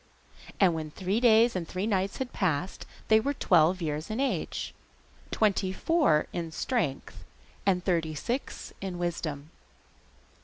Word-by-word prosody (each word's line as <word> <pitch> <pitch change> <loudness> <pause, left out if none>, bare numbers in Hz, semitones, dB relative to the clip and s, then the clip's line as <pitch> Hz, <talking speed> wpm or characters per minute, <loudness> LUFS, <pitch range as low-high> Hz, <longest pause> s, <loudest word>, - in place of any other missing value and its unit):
And 185 -4 +5
when 160 -1 -4
three 190 +7 -1
days 235 -1 +5
and 175 -3 -3
three 185 +2 -3
nights 195 -2 0
had 260 -1 -4
passed 180 -1 -1 0.2
they 220 0 +6
were 280 +5 -1
twelve 175 - +3
years 155 +2 -3
in 215 +3 -3
age, 275 0 -2 0.6
twenty 200 -3 +1
four 190 - +2
in 170 -2 -4
strength, 155 - -2 0.4
and 180 -2 +2
thirty 165 -4 0
six 245 - -4
in 190 -2 -4
wisdom. 160 -4 -3
185 Hz, 140 wpm, -28 LUFS, 160-220 Hz, 0.6 s, they